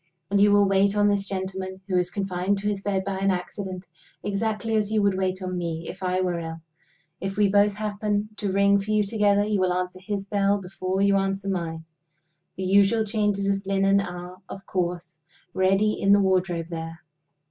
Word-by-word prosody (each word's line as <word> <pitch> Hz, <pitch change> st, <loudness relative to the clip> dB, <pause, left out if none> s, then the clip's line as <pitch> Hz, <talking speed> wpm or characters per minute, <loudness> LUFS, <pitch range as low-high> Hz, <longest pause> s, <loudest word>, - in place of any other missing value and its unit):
"And 200 Hz, 0 st, +3 dB
you 205 Hz, 0 st, +6 dB
will 205 Hz, 0 st, +5 dB
wait 195 Hz, +1 st, +2 dB
on 205 Hz, 0 st, +4 dB
this 200 Hz, -1 st, 0 dB
gentleman, 190 Hz, 0 st, -4 dB
who 190 Hz, -, -1 dB
is 180 Hz, 0 st, +2 dB
confined 195 Hz, 0 st, -1 dB
to 200 Hz, +1 st, -3 dB
his 205 Hz, -2 st, -1 dB
bed 195 Hz, -1 st, -1 dB
by 195 Hz, -1 st, -2 dB
an 195 Hz, 0 st, +1 dB
accident, 185 Hz, 0 st, -4 dB, 0.4 s
exactly 220 Hz, +2 st, -1 dB
as 210 Hz, -1 st, +1 dB
you 220 Hz, -, +2 dB
would 200 Hz, -1 st, +2 dB
wait 185 Hz, 0 st, -1 dB
on 185 Hz, 0 st, -3 dB
me 165 Hz, -1 st, -4 dB
if 185 Hz, -, -8 dB
I 185 Hz, 0 st, 0 dB
were 180 Hz, -2 st, -1 dB
ill. 165 Hz, 0 st, -6 dB, 0.6 s
If 195 Hz, +1 st, -4 dB
we 210 Hz, -1 st, +4 dB
both 205 Hz, +1 st, +3 dB
happen 210 Hz, 0 st, -2 dB
to 200 Hz, -2 st, -2 dB
ring 200 Hz, +1 st, +4 dB
for 200 Hz, +2 st, -6 dB
you 215 Hz, 0 st, +3 dB
together, 205 Hz, -1 st, +2 dB
you 210 Hz, -1 st, 0 dB
will 185 Hz, -1 st, +2 dB
answer 180 Hz, 0 st, -3 dB
his 200 Hz, -1 st, -3 dB
bell 200 Hz, 0 st, +1 dB
before 190 Hz, 0 st, -2 dB
you 200 Hz, 0 st, +4 dB
answer 195 Hz, 0 st, -1 dB
mine. 165 Hz, -3 st, -3 dB, 0.7 s
The 190 Hz, -, -3 dB
usual 200 Hz, +4 st, +4 dB
changes 205 Hz, -2 st, 0 dB
of 195 Hz, 0 st, 0 dB
linen 195 Hz, 0 st, +2 dB
are, 180 Hz, 0 st, -7 dB
of 195 Hz, -, -9 dB
course, 175 Hz, -2 st, -3 dB, 0.3 s
ready 195 Hz, +3 st, +2 dB
in 200 Hz, 0 st, +5 dB
the 205 Hz, -, +6 dB
wardrobe 180 Hz, -3 st, +1 dB
there? 165 Hz, 0 st, -6 dB
195 Hz, 200 wpm, -25 LUFS, 185-205 Hz, 0.7 s, you